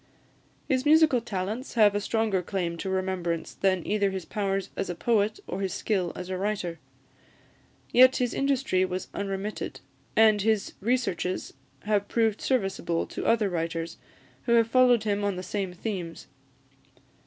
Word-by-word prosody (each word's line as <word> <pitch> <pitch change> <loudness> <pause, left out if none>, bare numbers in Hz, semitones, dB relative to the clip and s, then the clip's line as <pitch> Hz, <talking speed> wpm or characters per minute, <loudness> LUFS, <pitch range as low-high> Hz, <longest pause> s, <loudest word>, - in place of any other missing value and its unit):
His 260 -3 +1
musical 305 -4 +5
talents 215 +4 -4
have 210 -3 +5
a 205 - -1
stronger 215 -3 0
claim 175 -2 -2
to 190 - -4
remembrance 185 -3 -2
than 185 -3 0
either 205 -1 +1
his 190 -3 -5
powers 195 -2 -2
as - - -3
a 175 - -3
poet 215 +2 +1
or 195 - -4
his 190 -1 -2
skill 190 -6 -1
as 180 - -6
a 185 0 -3
writer. 190 -5 -2 1.1
Yet 255 +1 +7
his 245 -2 0
industry 270 -9 +1
was 185 0 -3
unremitted, 200 +1 -4 0.4
and 215 -2 +5
his 215 -1 +1
researches 205 -5 -1 0.3
have 205 -1 0
proved 225 -3 +1
serviceable 195 -8 0
to - - -3
other 230 -3 +3
writers 165 -2 -3 0.5
who 235 - +3
have 230 -1 +5
followed 245 -2 +4
him 205 -1 0
on 200 -2 0
the 185 - -5
same 190 0 -3
themes. 180 -3 -5
200 Hz, 155 wpm, -27 LUFS, 185-225 Hz, 1.1 s, Yet